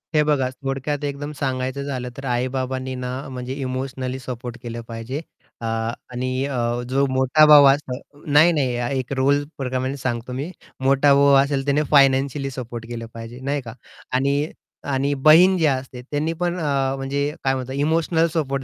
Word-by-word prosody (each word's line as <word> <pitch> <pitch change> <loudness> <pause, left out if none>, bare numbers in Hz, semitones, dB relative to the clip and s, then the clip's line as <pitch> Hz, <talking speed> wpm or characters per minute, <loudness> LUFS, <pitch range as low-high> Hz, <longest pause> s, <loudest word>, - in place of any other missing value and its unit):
हे 150 - +5
बघा. 145 -4 +1
थोडक्यात 135 +2 -3
एकदम 145 +1 -4
सांगायचं 130 -1 -2
झालं 130 -3 -4
तर 135 - -7
आई-बाबांनी 130 +1 -2
ना 125 0 -4 0.2
म्हणजे 125 0 -5
इमोशनली 130 -1 -4
सपोर्ट 125 -2 -6
केलं 120 -1 -5
पाहिजे 115 +6 -5 0.4
अ, - - -4 0.5
आणि 130 +2 -2
अ, 120 -3 -1
जो 135 +2 +2
मोठा 130 +4 +4
भाऊ 150 -2 +9
असतो 140 +1 -1
नाही, 150 +3 +5
नाही 130 -4 0
एक 130 +2 -4
रोल 140 +2 +3
प्रकारामध्ये 130 +1 -2
सांगतो 125 -1 -3
मी 140 +7 -4 0.3
मोठा 140 +1 +5
भाऊ 140 0 +5
असेल 140 -1 -2
त्याने 145 +2 +2
फायनान्शियली 135 0 +3
सपोर्ट 120 -3 -6
केलं 115 -1 -6
पाहिजे, 115 +2 -9
नाही 140 +2 -2
का 115 -3 -9 0.4
आणि 140 +3 +1 0.4
आणि 140 +2 +1
बहीण 160 +7 +6
जी 165 - +2
असते 130 -3 -1
त्यांनी 145 +5 -2
पण 175 +1 -2
अ, 135 -4 0
म्हणजे 140 +2 -1
काय 135 - +2
म्हणतात 130 0 -5
इमोशनल 160 +3 +2
सपोर्ट 140 -4 -1
135 Hz, 165 wpm, -22 LUFS, 130-145 Hz, 0.5 s, भाऊ